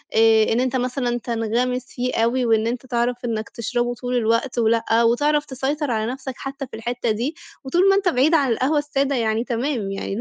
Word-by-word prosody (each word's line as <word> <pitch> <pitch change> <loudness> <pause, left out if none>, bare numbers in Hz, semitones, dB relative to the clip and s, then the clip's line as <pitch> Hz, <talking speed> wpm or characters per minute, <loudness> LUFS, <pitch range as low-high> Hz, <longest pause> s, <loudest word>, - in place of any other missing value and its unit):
آآ 220 0 +5
إن 230 - +1
أنت 255 +1 0
مثلًا 245 -1 -1
تنغَمِس 240 +2 -1
فيه 250 +1 -3
أوي، 235 +3 +1
وإن 225 -1 +2
أنت 245 +2 -3
تعرف 240 0 0
إنك 220 -2 -3
تشربه 240 +1 -2
طول 250 +1 -3
الوقت 235 +2 +1
ولأ، 230 0 +2
وتعرف 290 +6 +2
تسيطر 275 +2 -2
على 220 +1 -1
نفْسك 265 0 -6
حتّى 275 0 -6
في - - -10
الحتّة 235 +1 -2
دي، 240 +9 -2 0.3
وطول 350 +9 +3
ما 390 - +5
أنت 395 -2 +2
بعيد 290 +2 +2
عن 275 -5 +2
القهوة 260 +6 +1
السادة 280 -2 0
يعني 225 -1 0
تمام، 240 -4 -2
يعني 195 0 -4
245 Hz, 195 wpm, -22 LUFS, 230-270 Hz, 0.3 s, آآ